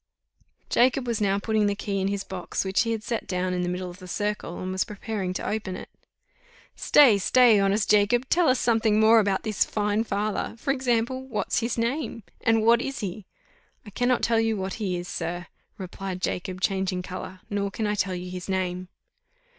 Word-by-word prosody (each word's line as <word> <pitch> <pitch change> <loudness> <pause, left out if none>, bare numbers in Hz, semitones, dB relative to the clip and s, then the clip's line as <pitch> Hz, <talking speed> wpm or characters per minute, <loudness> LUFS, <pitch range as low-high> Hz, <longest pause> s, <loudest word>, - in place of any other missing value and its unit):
Jacob 255 +1 +3
was 235 -3 -2
now 200 -1 +2
putting 215 0 +1
the 200 - 0
key 200 -1 -2
in 190 - 0
his 200 -1 -2
box, 190 +1 -4
which 190 0 +2
he 230 - 0
had 220 -1 -2
set 230 0 -3
down 180 0 -1
in 180 - -1
the 175 - -1
middle 180 +1 -3
of 175 - -14
the 185 - -11
circle, 205 -2 -3
and 185 0 -4
was 190 0 +1
preparing 205 -2 -4
to 185 - -4
open 210 -3 -3
it. - - -9 0.9
"Stay, 250 -9 +5
stay, 235 +1 +5
honest 195 +1 +2
Jacob! 215 +5 +3
tell 345 +2 +3
us 255 - +3
something 225 -2 +2
more 220 +1 +6
about 200 -2 +1
this 215 -3 +1
fine 210 +1 0
father; 210 0 -2
for 270 +4 0
example, 260 0 -1
what's 230 -5 -1
his 235 0 -2
name, 235 0 -2 0.2
and 225 -1 +3
what 235 +1 +5
is 275 -1 -4
he?" 200 0 -5 0.6
"I 205 - -10
cannot 245 +3 +1
tell 230 -1 +3
you 225 -1 +1
what 190 -1 -3
he 185 -4 -1
is, 175 0 -6
sir," 175 +1 -4 0.3
replied 190 0 -6
Jacob, 185 0 -3
changing 190 -2 0
colour, 185 0 -7
"nor 200 -1 -1
can 215 +2 -3
I 210 - 0
tell 190 -2 -1
you 180 0 -6
his 180 +1 -7
name." 185 -1 -2
205 Hz, 200 wpm, -26 LUFS, 185-225 Hz, 0.9 s, more